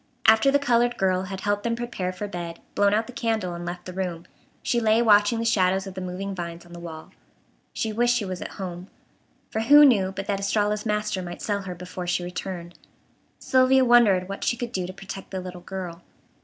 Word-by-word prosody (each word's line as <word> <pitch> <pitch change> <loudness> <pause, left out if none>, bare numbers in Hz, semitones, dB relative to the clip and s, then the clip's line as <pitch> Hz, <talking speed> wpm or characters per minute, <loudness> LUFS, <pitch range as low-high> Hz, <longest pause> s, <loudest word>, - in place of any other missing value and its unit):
After 220 +4 +6
the 280 - +4
colored 240 -3 +2
girl 185 -1 +1
had 190 0 -6
helped 205 +1 0
them 230 +2 -1
prepare 235 -6 -3
for 205 +3 -5
bed, 175 -3 -6
blown 200 0 +3
out 220 +2 +2
the 250 - -11
candle, 220 -7 -1
and 170 0 -6
left 175 0 -6
the 185 - -7
room, 180 -2 -4 0.4
she 240 - +1
lay 220 -1 +3
watching 210 0 +5
the 230 - -2
shadows 190 -3 +2
of 195 - -7
the 190 - -6
moving 185 +2 -4
vines 170 -2 -6
on 175 - -14
the 175 - -8
wall. 160 -2 -9 0.6
She 220 -1 -2
wished 240 +2 +3
she 230 -4 -1
was 185 -1 -5
at - - -6
home, 180 -1 -6 0.6
for 220 - -1
who 290 +6 +8
knew 200 -8 +4
but 195 0 -5
that 200 -2 -1
Estralla's 210 +2 0
master 210 -2 -1
might 175 -1 -7
sell 205 -1 -1
her 185 -2 -6
before 180 0 -7
she 180 0 0
returned. 175 -1 -6 0.6
Sylvia 260 0 +4
wondered 215 -7 +5
what 195 0 -6
she 240 - +1
could 240 -1 -4
do 185 -5 -2
to - - -6
protect 195 0 -8
the 190 - -4
little 180 -1 -8
girl. 180 -2 -6
195 Hz, 220 wpm, -25 LUFS, 180-225 Hz, 0.6 s, who